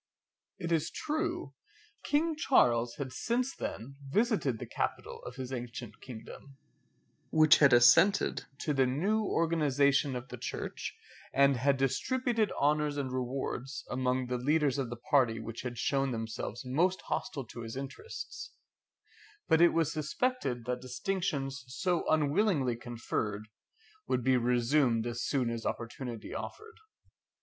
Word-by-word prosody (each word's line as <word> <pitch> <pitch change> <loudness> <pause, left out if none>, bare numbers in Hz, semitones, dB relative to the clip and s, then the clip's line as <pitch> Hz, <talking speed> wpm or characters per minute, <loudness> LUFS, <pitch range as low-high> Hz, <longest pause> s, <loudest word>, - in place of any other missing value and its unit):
It 170 -2 -4
is 165 -2 +1
true, 310 +1 -3 0.5
King 315 +2 +1
Charles 120 - +3
had 135 -3 -5
since 245 - -1
then 135 +5 -6
visited 205 - +1
the - - -6
capital - - -3
of 125 - -7
his 130 0 -5
ancient 120 -2 -6
kingdom, 130 +3 -10 1.0
had 140 -2 +7
assented 120 +11 +5 0.2
to 150 - 0
the 135 -2 +3
new 195 +12 +1
organization 145 -6 +2
of 125 +1 -6
the - - -8
church, - - -5 0.3
and 140 0 +4
had 135 +3 +2
distributed 225 - +1
honours 150 0 +1
and 135 -2 -2
rewards 130 +1 -3
among 125 0 0
the 125 0 -2
leaders 145 0 +2
of 130 -4 -2
the 120 - -4
party 120 -2 +2
which 115 0 -6
had 125 -2 -5
shown 135 +3 +1
themselves 115 +1 -4
most 170 +9 +1
hostile 135 -3 -3
to 120 +1 -9
his 115 0 -6
interests; 135 - -7 0.9
but 160 - +4
it 175 - +8
was 165 -3 +1
suspected 155 - -1
that 125 0 -2
distinctions 140 -1 -2
so 170 +7 -1
unwillingly 150 - +2
conferred 115 -3 -4 0.6
would 125 - 0
be 130 +1 +4
resumed 120 0 +2
as 120 0 -3
soon 125 -4 0
as 115 -1 -4
opportunity 120 -1 -5
offered. 440 +1 -7
135 Hz, 135 wpm, -31 LUFS, 120-160 Hz, 1.0 s, it